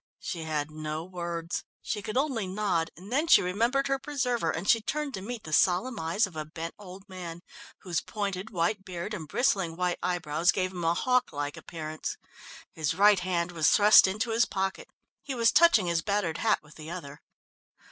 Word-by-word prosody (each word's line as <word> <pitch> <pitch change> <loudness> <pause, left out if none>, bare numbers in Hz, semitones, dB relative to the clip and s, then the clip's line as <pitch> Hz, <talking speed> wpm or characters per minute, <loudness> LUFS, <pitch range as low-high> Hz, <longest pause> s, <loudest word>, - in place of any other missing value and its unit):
She 165 -2 -5
had 155 -1 -2
no 155 +1 -4
words. 170 -2 -4 0.2
She 210 - -3
could 215 +3 -4
only 260 -8 0
nod, 185 -4 0
and 190 +6 -12
then 295 +6 +1
she 335 - +7
remembered 235 +9 +1
her 275 0 0
preserver, 250 - -1
and 165 +5 -3
she 230 - +5
turned 295 +4 -3
to 190 - -5
meet 230 +2 -6
the 155 - -7
solemn 195 +9 +2
eyes 165 +7 +1
of 185 -4 -12
a 155 - -3
bent 165 +2 -7
old 190 0 -11
man, 175 -3 -8 0.4
whose 175 -4 -1
pointed, 200 -1 -4
white 195 +2 -1
beard 185 +2 -5
and 165 -7 -5
bristling 195 - +1
white 180 0 -1
eyebrows 170 -1 +1
gave 185 -1 -1
him 180 -2 -6
a 165 +1 +2
hawk 250 +3 +1
like 145 -1 -3
appearance. 155 -1 -6 0.6
His 160 -1 -1
right 205 +1 +6
hand 175 -1 -1
was 160 -3 +3
thrust 210 -1 +7
into 215 +5 -2
his 230 +2 +3
pocket. 190 0 -3 0.3
He 270 - -5
was 230 -1 +4
touching 335 - +5
his 170 -1 +1
battered 200 -5 -1
hat 220 -2 +2
with 150 0 -17
the 155 0 -9
other. 150 -5 -8
185 Hz, 195 wpm, -28 LUFS, 165-215 Hz, 0.6 s, she